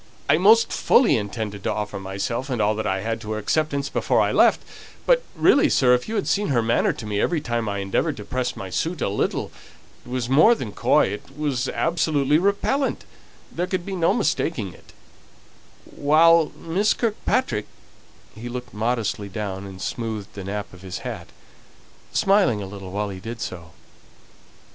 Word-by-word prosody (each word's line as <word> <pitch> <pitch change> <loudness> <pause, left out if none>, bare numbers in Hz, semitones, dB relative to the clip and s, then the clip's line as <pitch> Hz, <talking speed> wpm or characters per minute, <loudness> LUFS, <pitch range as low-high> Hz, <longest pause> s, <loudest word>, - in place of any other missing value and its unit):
I 155 - +4
most 220 +5 +5
fully 245 - +4
intended 105 -1 -4
to - - 0
offer 105 -1 -3
myself 100 +7 -3
and 125 -3 -2
all 105 0 +2
that 110 0 -3
I 95 -1 -1
had 115 +2 -3
to 110 0 -4
her - - -3
acceptance 140 +5 0
before - - +1
I - - +2
left; - - +4 0.4
but - - +4
really, 285 - +4
sir, 125 -2 +4
if 125 +7 0
you 225 - -3
had 205 - -1
seen 205 +1 +1
her 120 -5 +1
manner 115 +1 +2
to 110 - -8
me 105 -1 -1
every 170 -2 +1
time 120 -5 -2
I 100 - -2
endeavoured 95 -1 -1
to 105 - -8
press 125 +2 -2
my 95 -1 -7
suit 160 - -2
a - - 0
little 100 - -1 0.5
it - - -14
was 125 -2 -2
more 155 - +6
than 115 - -6
coy, - - +3
it 120 +7 -8
was 135 -4 -1
absolutely 155 -3 +1
repellent, 200 +9 0 0.5
there 175 +2 -2
could 180 -1 -2
be 195 - -4
no 170 -1 +2
mistaking 160 - -1
it, - - -18 0.9
while 160 +2 +4
Miss 190 +6 +1
Kirkpatrick 215 - -1 0.4
" - - -28
he 115 +3 -8
looked 125 0 -7
modestly 110 -2 -1
down, 100 -1 -5
and 95 -1 -10
smoothed 110 0 -4
the 100 - -7
nap 100 +1 -5
of 90 - -13
his 95 -1 -6
hat, - - -5 0.8
smiling 195 - +3
a 100 - -5
little 95 -1 -9
while 105 +1 -2
he 95 -1 -7
did 115 +5 -7
so. 85 -5 -6
120 Hz, 185 wpm, -23 LUFS, 105-165 Hz, 0.9 s, more